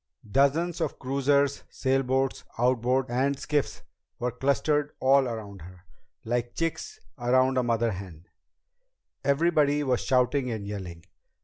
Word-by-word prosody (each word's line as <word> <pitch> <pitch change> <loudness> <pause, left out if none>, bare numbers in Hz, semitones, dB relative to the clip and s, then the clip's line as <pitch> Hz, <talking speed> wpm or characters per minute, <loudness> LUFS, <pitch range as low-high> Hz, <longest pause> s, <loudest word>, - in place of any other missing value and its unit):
Dozens 145 +9 +1
of 155 - -2
cruisers, 140 +1 +1
sailboats, 135 0 0
outboards, 125 +1 +1
and 135 +3 +1
skiffs 145 0 -2 0.3
were 125 +1 -2
clustered 145 +3 0
all 135 0 +4
around 105 -5 -6
her, 90 +2 -13 0.4
like 120 +1 -2
chicks 165 - -3 0.2
around 130 +2 +3
a 130 - +3
mother 115 -1 +1
hen. 90 -4 -9 1.0
Everybody 145 0 +2
was 130 -3 +1
shouting 125 0 +1
and 110 -4 -4
yelling. 95 -5 -7
130 Hz, 120 wpm, -27 LUFS, 115-140 Hz, 1.0 s, all